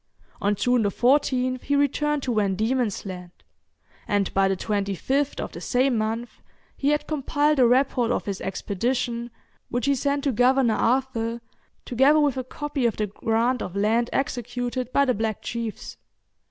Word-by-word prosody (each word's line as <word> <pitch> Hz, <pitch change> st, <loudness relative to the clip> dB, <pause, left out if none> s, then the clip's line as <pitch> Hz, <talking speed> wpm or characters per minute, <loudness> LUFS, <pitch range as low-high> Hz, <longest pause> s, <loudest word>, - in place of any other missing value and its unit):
On 205 Hz, +1 st, +2 dB
June 245 Hz, +3 st, +2 dB
14th 255 Hz, +3 st, +2 dB
he 285 Hz, -, 0 dB
returned 285 Hz, +1 st, +1 dB
to 250 Hz, -, -1 dB
Van 200 Hz, -3 st, +1 dB
Diemen's 220 Hz, 0 st, -1 dB
Land, 180 Hz, -2 st, -7 dB, 0.8 s
and 205 Hz, -2 st, 0 dB
by 195 Hz, 0 st, +3 dB
the 195 Hz, -1 st, 0 dB
25th 210 Hz, +9 st, -1 dB
of -, -, -4 dB
the -, -, -9 dB
same 255 Hz, 0 st, +1 dB
month 225 Hz, +2 st, -3 dB, 0.3 s
he 280 Hz, -, 0 dB
had 295 Hz, 0 st, +1 dB
compiled 295 Hz, 0 st, +1 dB
a 250 Hz, -, +6 dB
report 250 Hz, -1 st, +2 dB
of 245 Hz, -, -1 dB
his 200 Hz, -2 st, -4 dB
expedition, 235 Hz, +5 st, -2 dB, 0.4 s
which 245 Hz, +2 st, -1 dB
he 280 Hz, -, +3 dB
sent 280 Hz, +1 st, -1 dB
to 280 Hz, -, +1 dB
Governor 250 Hz, 0 st, +3 dB
Arthur, 235 Hz, -1 st, 0 dB, 0.5 s
together 270 Hz, +5 st, +4 dB
with 290 Hz, -3 st, +2 dB
a 260 Hz, -, -3 dB
copy 280 Hz, 0 st, -2 dB
of 230 Hz, -, -3 dB
the 215 Hz, -, 0 dB
grant 225 Hz, +4 st, 0 dB
of 180 Hz, -, -5 dB
land 225 Hz, +4 st, +1 dB
executed 245 Hz, -1 st, -2 dB
by 280 Hz, -, +3 dB
the 255 Hz, -, +2 dB
black 220 Hz, -1 st, -2 dB
chiefs. 230 Hz, -2 st, -5 dB
245 Hz, 165 wpm, -24 LUFS, 220-270 Hz, 0.8 s, a